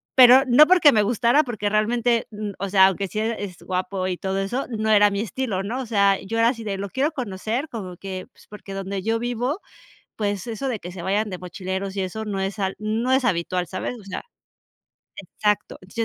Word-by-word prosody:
pero 255 Hz, +1 st, +9 dB
no 255 Hz, +5 st, +8 dB
porque 355 Hz, -5 st, +6 dB
me 210 Hz, -, +4 dB
gustara, 240 Hz, +6 st, +3 dB
porque 220 Hz, -5 st, -3 dB
realmente, 230 Hz, +2 st, +1 dB
n 210 Hz, -1 st, -5 dB
o 195 Hz, 0 st, -3 dB
sea, 190 Hz, -1 st, +6 dB
aunque 195 Hz, +1 st, -1 dB
sí 215 Hz, -, -3 dB
a 225 Hz, +1 st, 0 dB
es 190 Hz, -4 st, -6 dB
guapo 185 Hz, 0 st, -2 dB
y 180 Hz, -, -1 dB
todo 190 Hz, 0 st, -2 dB
eso 240 Hz, +8 st, -2 dB
no 220 Hz, -2 st, -2 dB
era 205 Hz, -1 st, +6 dB
mi 200 Hz, -, -2 dB
estilo, 215 Hz, -2 st, -2 dB
¿no? 245 Hz, +6 st, -3 dB
O -, -, -5 dB
sea, 200 Hz, -3 st, +3 dB
yo 225 Hz, +4 st, -4 dB
era 230 Hz, +1 st, +5 dB
así 230 Hz, -3 st, -4 dB
de: 195 Hz, -2 st, -2 dB
"Lo 200 Hz, 0 st, -4 dB
quiero 280 Hz, -, 0 dB
conocer". 235 Hz, +4 st, -3 dB
Como 185 Hz, -6 st, -7 dB
que, 190 Hz, -1 st, -6 dB, 0.2 s
porque 205 Hz, -2 st, -9 dB
donde 195 Hz, 0 st, -4 dB
yo 225 Hz, +1 st, 0 dB
vivo, 245 Hz, -, -2 dB, 0.6 s
pues, 205 Hz, -2 st, -2 dB
eso 235 Hz, +4 st, -3 dB
de 225 Hz, -5 st, -2 dB
que 175 Hz, -, -8 dB
se 180 Hz, -, -7 dB
vayan 205 Hz, +3 st, 0 dB
de 180 Hz, -, -5 dB
mochileros, 190 Hz, +2 st, -5 dB
y -, -, +1 dB
eso, 220 Hz, +4 st, -4 dB
no 200 Hz, -2 st, -3 dB
es 195 Hz, +2 st, -3 dB
al 190 Hz, -1 st, -1 dB
no 220 Hz, +4 st, -1 dB
es 260 Hz, -2 st, +3 dB
habitual, 180 Hz, -3 st, 0 dB
¿sabes? 245 Hz, -, -4 dB
O -, -, -14 dB
sea, 195 Hz, -, -5 dB, 1.0 s
exacto, 210 Hz, -1 st, -2 dB
entonces 185 Hz, +5 st, -16 dB
210 Hz, 220 wpm, -23 LUFS, 195-235 Hz, 1.0 s, pero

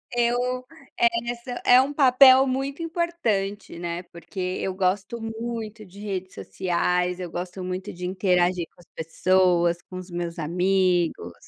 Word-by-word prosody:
Eu 245 Hz, +1 st, +1 dB, 0.3 s
essa 235 Hz, +1 st, -1 dB
é 250 Hz, +1 st, +8 dB
um 270 Hz, +2 st, -1 dB
papel 265 Hz, -1 st, +7 dB
muito 270 Hz, +4 st, -2 dB
importante, 320 Hz, -, -2 dB
né, 175 Hz, 0 st, -4 dB
porque 175 Hz, +3 st, -11 dB
eu 185 Hz, +1 st, -2 dB
gosto 195 Hz, +4 st, -1 dB
muito 225 Hz, -1 st, -5 dB
de 190 Hz, +2 st, -15 dB
redes 190 Hz, -3 st, -5 dB
sociais, 180 Hz, -, -1 dB
eu 180 Hz, -1 st, -5 dB
gosto 180 Hz, +2 st, -6 dB
muito 185 Hz, +2 st, -4 dB
de 180 Hz, +1 st, -6 dB
interagir 180 Hz, -2 st, +1 dB
com -, -, -28 dB
as 175 Hz, -, -19 dB
pessoas, 175 Hz, +1 st, +2 dB
com 185 Hz, -, -10 dB
os 185 Hz, 0 st, -8 dB
meus 175 Hz, 0 st, -4 dB
amigos, 175 Hz, -, +1 dB
190 Hz, 140 wpm, -25 LUFS, 180-235 Hz, 0.3 s, é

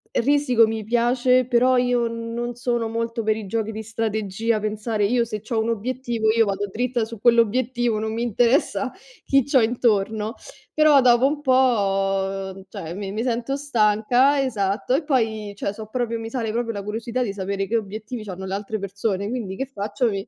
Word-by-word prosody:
Risiko 255 Hz, -3 st, +3 dB
mi 220 Hz, 0 st, -3 dB
piace, 245 Hz, +3 st, +3 dB
però 250 Hz, +1 st, +3 dB
io 245 Hz, -1 st, +2 dB
non 230 Hz, +1 st, -4 dB
sono 240 Hz, -1 st, -1 dB
molto 230 Hz, 0 st, -3 dB
per 215 Hz, 0 st, +2 dB
i 215 Hz, -2 st, -6 dB
giochi 220 Hz, +2 st, -2 dB
di 220 Hz, 0 st, -6 dB
strategia, 220 Hz, 0 st, -1 dB
pensare. 215 Hz, 0 st, -1 dB
Io 235 Hz, +3 st, +2 dB
se 215 Hz, -2 st, -5 dB
c'ho 220 Hz, +1 st, -2 dB
un 220 Hz, -, 0 dB
obiettivo, 235 Hz, 0 st, -2 dB
io 225 Hz, 0 st, +3 dB
vado 200 Hz, 0 st, -2 dB
dritta 245 Hz, +1 st, -1 dB
su 225 Hz, -1 st, -7 dB
quell'obiettivo, 235 Hz, +1 st, +2 dB
non 220 Hz, +1 st, -2 dB
mi 230 Hz, -, -3 dB
interessa 240 Hz, +3 st, +1 dB, 0.3 s
chi 275 Hz, -1 st, +3 dB
c'ho 270 Hz, 0 st, +3 dB
intorno, 220 Hz, -1 st, +1 dB, 0.4 s
però 305 Hz, -3 st, +5 dB
dopo 245 Hz, 0 st, +5 dB
un 290 Hz, +2 st, 0 dB
po', 195 Hz, -7 st, +1 dB
cioè, 165 Hz, -2 st, -7 dB
mi 195 Hz, +1 st, -5 dB
mi 215 Hz, +3 st, -2 dB
sento 245 Hz, +2 st, -1 dB
stanca, 245 Hz, +1 st, +3 dB
esatto, 215 Hz, -4 st, -1 dB
e 280 Hz, -, +2 dB
poi 220 Hz, -7 st, -1 dB
cioè 200 Hz, 0 st, -3 dB
so' 215 Hz, 0 st, -9 dB
proprio 230 Hz, -1 st, -2 dB
mi 225 Hz, 0 st, -6 dB
sale 230 Hz, -3 st, -2 dB
proprio 230 Hz, 0 st, -2 dB
la 200 Hz, -, -5 dB
curiosità 230 Hz, +4 st, -2 dB
di 200 Hz, -, -3 dB
sapere 195 Hz, 0 st, -2 dB
che 225 Hz, -, -2 dB
obiettivi 215 Hz, +2 st, -4 dB
c'hanno 190 Hz, -2 st, -7 dB
le 190 Hz, -, -4 dB
altre 205 Hz, +2 st, -3 dB
persone, 200 Hz, 0 st, -2 dB
quindi 220 Hz, -6 st, -4 dB
che 270 Hz, -, -3 dB
faccio? 210 Hz, -1 st, -2 dB
Mi 195 Hz, 0 st, -4 dB
225 Hz, 185 wpm, -23 LUFS, 210-245 Hz, 0.4 s, però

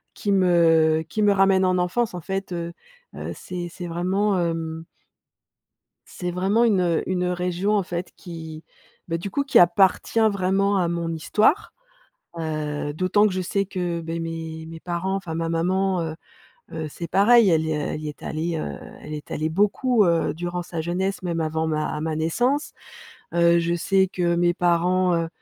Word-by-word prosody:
qui 205 Hz, -, -2 dB
me 165 Hz, -4 st, +4 dB
qui 215 Hz, -, -2 dB
me 205 Hz, -, +5 dB
ramènent 195 Hz, -1 st, +4 dB
en 185 Hz, 0 st, +2 dB
enfance 210 Hz, +6 st, 0 dB
en -, -, -4 dB
fait». 195 Hz, +3 st, -4 dB
Heu, 170 Hz, 0 st, -4 dB, 0.4 s
heu -, -, -5 dB
c'est 175 Hz, -1 st, -6 dB
c'est 175 Hz, 0 st, -7 dB
vraiment 190 Hz, +4 st, 0 dB
heum 165 Hz, -1 st, -2 dB, 1.2 s
c'est 180 Hz, -1 st, -5 dB
vraiment 195 Hz, +6 st, +2 dB
une, 205 Hz, -6 st, +3 dB
heu, 170 Hz, -2 st, +1 dB
une 180 Hz, -1 st, 0 dB
région, 180 Hz, +3 st, 0 dB
en 200 Hz, -, +1 dB
fait, 175 Hz, 0 st, -5 dB
qui, 160 Hz, -3 st, -9 dB, 0.4 s
bah, 165 Hz, -1 st, -1 dB
du 195 Hz, +4 st, -5 dB
coup, 280 Hz, -, 0 dB
qui 275 Hz, -, +4 dB
appartient 185 Hz, +5 st, +3 dB
vraiment 195 Hz, +1 st, +1 dB
à 180 Hz, -2 st, +1 dB
mon 170 Hz, -1 st, -2 dB
histoire. 215 Hz, -, +1 dB, 0.6 s
Heu 150 Hz, -2 st, -3 dB
d'autant 185 Hz, +5 st, +3 dB
que 200 Hz, -, -3 dB
je 185 Hz, -, -1 dB
sais 200 Hz, +2 st, -1 dB
que, 180 Hz, -3 st, -3 dB
beh, 165 Hz, +1 st, -4 dB
mes 165 Hz, -1 st, -5 dB
mes 165 Hz, 0 st, -9 dB
parents, 180 Hz, +2 st, -2 dB
enfin 175 Hz, -4 st, -4 dB
ma 165 Hz, 0 st, -2 dB
maman, 185 Hz, +3 st, 0 dB
heu, 160 Hz, -1 st, -4 dB, 0.6 s
heu, 160 Hz, -1 st, -4 dB
c'est 170 Hz, +3 st, -7 dB
pareil 225 Hz, +4 st, +5 dB
elle 160 Hz, -1 st, +3 dB
y 160 Hz, -, -2 dB
est -, -, 0 dB, 0.2 s
elle 155 Hz, -, -5 dB
y 155 Hz, -, -5 dB
est 150 Hz, -, -11 dB
allée, 165 Hz, +2 st, -2 dB
heu, 70 Hz, -, -4 dB, 0.3 s
elle 150 Hz, -, -8 dB
est 150 Hz, -1 st, -7 dB
allée 155 Hz, +1 st, -1 dB
beaucoup, 210 Hz, +6 st, +2 dB
heu, 170 Hz, -4 st, +2 dB
durant 175 Hz, +2 st, -4 dB
sa 170 Hz, -2 st, -4 dB
jeunesse 185 Hz, +4 st, -2 dB
même 170 Hz, -2 st, -2 dB
avant 160 Hz, 0 st, -1 dB
ma 155 Hz, -1 st, -1 dB
ma 160 Hz, 0 st, -2 dB
naissance. 245 Hz, -, 0 dB, 0.6 s
Heu, 170 Hz, 0 st, +4 dB
je 170 Hz, 0 st, 0 dB
sais 190 Hz, +2 st, +2 dB
que 175 Hz, -2 st, 0 dB
mes 175 Hz, 0 st, +2 dB
parents, 180 Hz, +1 st, +2 dB
heu, 165 Hz, -1 st, 0 dB
175 Hz, 185 wpm, -23 LUFS, 165-190 Hz, 1.2 s, me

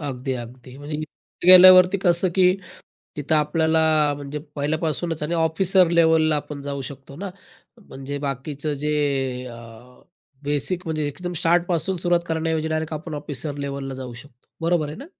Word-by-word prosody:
अगदी, 135 Hz, -2 st, -4 dB
अगदी, 125 Hz, +1 st, -9 dB
म्हणजे 150 Hz, +1 st, -5 dB
इथे 155 Hz, +2 st, -9 dB
गेल्यावरती 185 Hz, +1 st, +9 dB
कसं, 175 Hz, 0 st, +3 dB
की 185 Hz, 0 st, +4 dB, 0.6 s
तिथं 150 Hz, +1 st, 0 dB
आपल्याला 160 Hz, +1 st, +2 dB, 0.3 s
म्हणजे 145 Hz, +1 st, -6 dB, 0.2 s
पहिल्यापासूनच 155 Hz, +2 st, -2 dB
आणि 160 Hz, +3 st, -2 dB
ऑफिसर 170 Hz, +3 st, +3 dB
लेवलला 160 Hz, -2 st, +3 dB
आपण 145 Hz, -1 st, -5 dB
जाऊ 140 Hz, -1 st, -4 dB
शकतो 135 Hz, +1 st, -10 dB
ना, 195 Hz, +4 st, -6 dB, 0.6 s
म्हणजे 135 Hz, +1 st, -6 dB
बाकीचं 140 Hz, +2 st, -4 dB
जे 150 Hz, +2 st, -2 dB, 0.5 s
अ, 120 Hz, -2 st, -9 dB, 0.9 s
बेसिक 145 Hz, +5 st, -2 dB
म्हणजे 155 Hz, -2 st, -2 dB
एकदम 175 Hz, +5 st, -6 dB
स्टार्टपासून 175 Hz, +1 st, +1 dB
सुरुवात 175 Hz, 0 st, +1 dB
करण्याऐवजी, 160 Hz, -1 st, -1 dB
डायरेक्ट 160 Hz, 0 st, -2 dB
आपण 155 Hz, +1 st, -6 dB
ऑफिसर 145 Hz, 0 st, -5 dB
लेवलला 140 Hz, -1 st, -5 dB
जाऊ 130 Hz, -2 st, -7 dB
शकतो. 120 Hz, +1 st, -15 dB
बरोबर 165 Hz, -2 st, +1 dB
आहे 150 Hz, -, -7 dB
ना? 275 Hz, -, -9 dB
155 Hz, 145 wpm, -23 LUFS, 140-170 Hz, 0.9 s, गेल्यावरती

